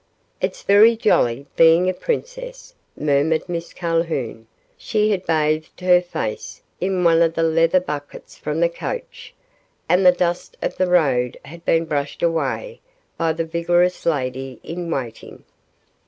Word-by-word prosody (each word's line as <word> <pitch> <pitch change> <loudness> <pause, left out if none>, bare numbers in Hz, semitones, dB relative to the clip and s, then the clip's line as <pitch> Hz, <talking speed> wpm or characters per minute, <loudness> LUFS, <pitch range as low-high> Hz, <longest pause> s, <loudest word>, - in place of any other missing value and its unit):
"It's - - -3
very 215 +3 +6
jolly 135 - +2
being 165 +2 +5
a 185 - +1
princess," - - -5 0.2
murmured 150 +2 +1
Miss 170 -1 -5
Calhoun. 165 -10 -2 0.3
She 215 0 0
had 190 -3 -2
bathed 155 0 0
her 180 -1 +5
face 175 -11 -5 0.2
in 185 0 -1
one 165 -1 +4
of 165 0 +2
the 165 - +1
leather 165 +2 +3
buckets 150 -5 -7
from 150 +2 -3
the 170 - +5
coach, 170 - -7 0.5
and 180 +2 +3
the 180 - +8
dust 175 0 -2
of - - -3
the 185 - +1
road 135 -9 +2
had 170 +4 -12
been 165 0 +2
brushed 145 -1 -3
away 170 - -1 0.3
by 165 -1 0
the 165 +1 -3
vigorous 175 +2 +1
lady 130 -3 -2
in 170 +1 -5
waiting. 125 -8 -6
165 Hz, 145 wpm, -21 LUFS, 150-180 Hz, 0.5 s, the